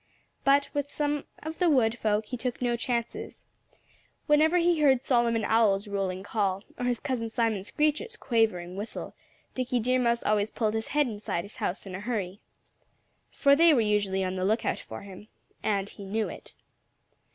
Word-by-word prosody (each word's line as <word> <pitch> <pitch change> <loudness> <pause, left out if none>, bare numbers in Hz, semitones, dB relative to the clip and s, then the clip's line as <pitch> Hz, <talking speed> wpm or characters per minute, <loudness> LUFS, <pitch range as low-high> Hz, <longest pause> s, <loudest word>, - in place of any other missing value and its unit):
But 280 +1 +4
with 285 -1 -2
some 295 -1 -1 0.2
of 315 +1 -6
the 355 -2 +4
wood 235 -6 +3
folk 215 -2 0
he 250 - -5
took 250 0 -3
no 245 -1 +1
chances. 235 0 -3 0.8
Whenever 310 +3 +4
he 345 -1 +3
heard 265 -3 +4
Solomon 235 -4 +2
Owl's 210 -2 +3
rolling 195 -2 -2
call, 200 -2 -1 0.2
or 245 - -1
his 245 -1 0
cousin 250 -5 -2
Simon 225 -4 0
Screecher's 305 - -1
quavering 205 -7 0
whistle, 205 +3 -6 0.4
Dickie 250 -1 -1
Deer 255 +3 +2
Mouse 235 -1 +1
always 210 0 +1
pulled 215 -2 -1
his 220 0 -2
head 295 0 +2
inside 205 -6 -3
his 200 - -12
house 180 - -3
in 190 - -8
a 185 - -4
hurry. 205 -3 -3 0.9
For 280 -1 +4
they 330 0 +6
were 240 - +4
usually 205 -3 +1
on 185 0 -2
the 185 - -1
lookout 215 +4 +1
for 110 - -9
him. 200 +1 -11 0.3
And 200 -2 0
he 200 - -10
knew 210 +3 -1
it. - - -11
230 Hz, 175 wpm, -28 LUFS, 205-265 Hz, 0.9 s, they